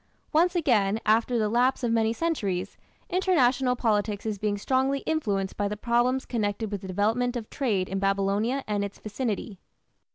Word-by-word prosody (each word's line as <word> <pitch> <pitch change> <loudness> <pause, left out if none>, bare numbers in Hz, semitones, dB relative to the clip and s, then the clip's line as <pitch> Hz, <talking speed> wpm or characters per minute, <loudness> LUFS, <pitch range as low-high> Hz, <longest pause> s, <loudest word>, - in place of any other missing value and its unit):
Once 345 +4 +3
again, 220 - +2
after 225 +3 +3
the 215 -2 +1
lapse 250 +4 +2
of 235 - +1
many 225 -1 +2
centuries, 205 - -2 0.3
international 265 -9 +2
politics 210 -3 0
is 215 -2 -2
being 205 0 -1
strongly 265 +5 +1
influenced 205 -12 -1
by 205 - 0
the 210 +1 -4
problems 240 +4 +1
connected 215 -2 -2
with 200 -2 -3
the 190 - -8
development 225 +6 0
of 230 -3 -4
trade 210 -9 0
in 195 - -3
Babylonia 200 +6 0
and 205 -1 -1
its 200 0 -6
vicinity. 215 -3 -4
220 Hz, 165 wpm, -27 LUFS, 205-255 Hz, 0.3 s, Once